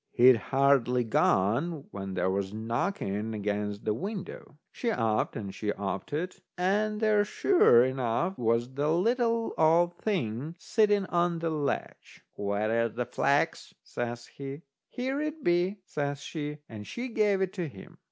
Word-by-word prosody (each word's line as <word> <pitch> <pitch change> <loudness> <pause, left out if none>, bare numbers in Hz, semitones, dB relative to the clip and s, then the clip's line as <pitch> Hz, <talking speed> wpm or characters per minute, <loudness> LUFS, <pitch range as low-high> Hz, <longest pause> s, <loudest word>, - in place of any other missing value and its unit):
He'd 125 0 +7
hardly 130 0 +2
gone, 120 - +1
when 95 -1 -5
there 95 - +1
was 95 0 -2
a - - -6
knocking 110 - -2
against 105 0 -3
the 105 - +2
window. 190 - -6
She 240 - -2
upped 115 - 0
and 100 -3 -5
she 105 -1 -2
oped 100 -2 -4
it, 175 +5 -3 0.2
and 210 +4 +1
there 215 -2 +3
sure 205 - +5
enough 130 +7 -1
was 120 0 0
the 145 +3 0
little 230 +5 +1
old 170 +2 +4
thing 150 - -2
sitting 205 +1 +2
on 175 -1 +1
the 165 0 -2
ledge. 150 -3 -4
"Where's 110 +3 0
the 125 0 -1
flax?" 140 +3 0
says 120 0 -4
he. 140 +3 -8 0.3
"Here 265 +3 -2
it 305 -1 -4
be," 175 +3 +2
says 145 -3 -3
she. 150 0 -5
And 105 -2 -9
she 245 +2 -4
gave 210 -4 +2
it 190 -1 0
to 180 -5 -3
him. 100 -9 -13
140 Hz, 150 wpm, -29 LUFS, -, 0.3 s, He'd